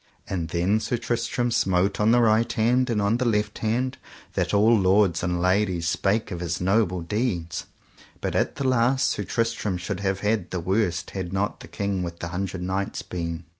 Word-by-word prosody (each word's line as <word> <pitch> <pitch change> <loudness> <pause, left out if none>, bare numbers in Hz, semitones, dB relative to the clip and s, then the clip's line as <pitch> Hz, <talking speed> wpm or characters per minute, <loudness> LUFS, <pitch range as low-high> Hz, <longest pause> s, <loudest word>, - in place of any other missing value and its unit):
And 85 -4 -2
then 90 +6 +1
Sir 115 +2 -1
Tristram 120 +1 -1
smote 95 -2 +1
on 105 +1 +3
the 120 +1 +5
right 115 +1 +3
hand 125 +3 +2
and 115 -3 +1
on 100 +3 +2
the 125 - -1
left 105 -2 0
hand, 125 +4 -1 0.3
that - - 0
all 105 +3 +5
lords 95 -3 +3
and 90 0 -1
ladies 90 -2 +1
spake 100 +6 0
of 90 - -4
his 85 -2 -2
noble 95 -1 +1
deeds. 85 -4 -2 0.5
But - - -3
at - - +1
the 140 -2 -1
last 130 +1 +3
Sir - - -2
Tristram 115 -5 -1
should 90 +1 -4
have 95 0 -1
had 105 -3 0
the 90 - -3
worse 90 0 0
had 95 -3 -4
not 100 +3 -1
the - - -11
King 100 -2 -2
with 85 -1 -5
the 85 - -5
Hundred 90 +1 -3
Knights 95 +2 -2
been. 85 -1 -4
100 Hz, 195 wpm, -25 LUFS, 90-115 Hz, 0.5 s, the